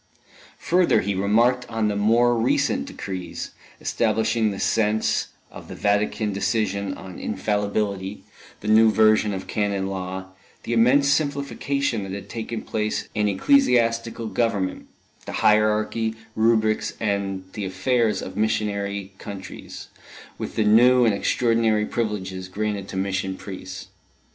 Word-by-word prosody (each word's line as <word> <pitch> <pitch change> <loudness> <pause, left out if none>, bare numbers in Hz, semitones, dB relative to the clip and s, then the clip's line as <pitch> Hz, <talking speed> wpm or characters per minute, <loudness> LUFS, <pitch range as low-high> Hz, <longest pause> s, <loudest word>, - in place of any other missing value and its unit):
Further, 180 0 +3
he 100 +2 -1
remarked 115 +6 +2
on 115 -2 0
the 105 - -1
more 115 +4 +3
recent 115 +1 +1
decrees, 95 -2 -6 0.3
establishing 110 0 +1
the 100 -1 -5
sense 110 -1 +1 0.2
of - - -11
the - - -8
Vatican 105 +1 0
decision 100 -2 -1
on 95 -1 -10
infallibility, 100 -1 -2 0.4
the 105 - -7
new 110 +1 +6
version 110 -1 +4
of 95 -1 -4
Canon 100 -2 -1
Law, 95 0 -5 0.3
the 120 - -3
immense 125 +5 +4
simplification 140 -3 0
that 95 -1 -6
had 100 0 -7
taken 115 0 -5
place 110 -1 -2
in 105 -1 +1
ecclesiastical 115 - +2
government, 105 -4 -1 0.4
the - - -5
hierarchy, 110 +1 +2 0.2
rubrics 110 -1 +2
and 100 -3 -1
the 105 - -4
affairs 115 +3 0
of 95 - -7
missionary 100 -2 -1
countries, 100 -2 -9 0.5
with - - -5
the 110 - +2
new 120 +4 +6
and 110 - +3
extraordinary 115 0 +1
privileges 95 -5 -3
granted 100 0 -3
to 95 - -6
mission 95 0 -2
priests. 95 -1 -8
105 Hz, 130 wpm, -23 LUFS, 100-115 Hz, 0.5 s, new